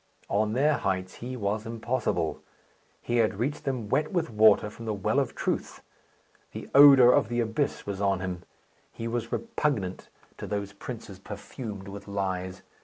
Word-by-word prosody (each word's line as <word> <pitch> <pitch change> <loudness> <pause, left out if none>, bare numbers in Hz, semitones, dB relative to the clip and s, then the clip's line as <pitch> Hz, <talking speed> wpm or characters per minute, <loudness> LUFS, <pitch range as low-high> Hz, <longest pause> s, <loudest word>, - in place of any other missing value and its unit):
On 105 +1 +1
their 145 +4 +3
heights 95 -1 -2
he 125 +2 -5
was 105 +1 -2
impossible. 115 -7 -1 0.6
He 120 - 0
had 110 -3 +2
reached 140 +7 -2
them 130 -6 -2
wet 155 +8 0
with 175 -9 -1
water 105 -1 +5
from 115 - -10
the 110 -1 -1
well 95 - +1
of - - -2
Truth; - - -3 0.7
the - - -7
odour 135 -3 +9
of 110 - +3
the 120 0 -1
abyss 120 +5 -1
was 100 -1 -4
on 100 -2 +2
him. 90 -2 -4 0.5
He 115 - -6
was 120 0 -3
repugnant 140 - -2 0.3
to - - -5
those 100 -1 -3
princes 105 -2 -8
perfumed 105 0 -8
with 100 +1 -9
lies. 95 -1 -3
110 Hz, 165 wpm, -27 LUFS, 100-125 Hz, 0.7 s, odour